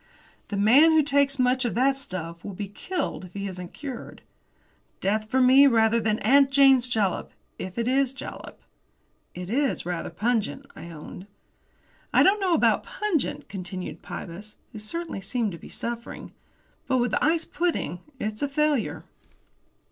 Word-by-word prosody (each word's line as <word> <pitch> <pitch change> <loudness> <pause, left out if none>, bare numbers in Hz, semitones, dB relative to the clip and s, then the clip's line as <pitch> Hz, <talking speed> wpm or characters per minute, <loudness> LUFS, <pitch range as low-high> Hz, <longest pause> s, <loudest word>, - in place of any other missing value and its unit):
"The 205 - -4
man 265 +11 +6
who 315 -1 +5
takes 280 -1 +2
much 255 0 +2
of 240 - -1
that 265 +3 +3
stuff 170 -10 -7
will 200 - -7
be 205 +1 -4
killed 345 - -4
if 180 - -14
he 200 0 -3
isn't 180 -2 -7
cured. 270 -5 -8 0.8
Death 215 +3 -1
for 260 - +2
me, 260 +2 +7
rather 230 -2 +4
than 215 -1 0
'Aunt 275 0 +5
Jane's 270 -3 +5
Jalap' 210 -6 -1 0.3
if 185 +2 -6
it 235 0 -1
is 265 0 +2
jalap." 270 - -9 0.8
"It 180 0 -6
is 275 -4 0
rather 175 -1 -3
pungent," 210 -3 -1
I 170 - -9
owned. 170 +4 -10 0.8
"I - - +5
don't 400 +2 +4
know 365 -3 +3
about - - +3
pungent," 415 -9 -2
continued 185 -4 -6
Pybus, 200 +5 -8
who 220 - -8
certainly 330 +1 -4
seemed 225 +1 -1
to 170 - -8
be - - -12
suffering; 235 0 -6 0.6
"but 260 - +2
with 245 0 0
ice 325 +2 +2
pudding 310 - -2 0.2
it's 215 0 -4
a 285 - 0
failure." 295 -3 0
235 Hz, 160 wpm, -26 LUFS, 195-275 Hz, 0.8 s, me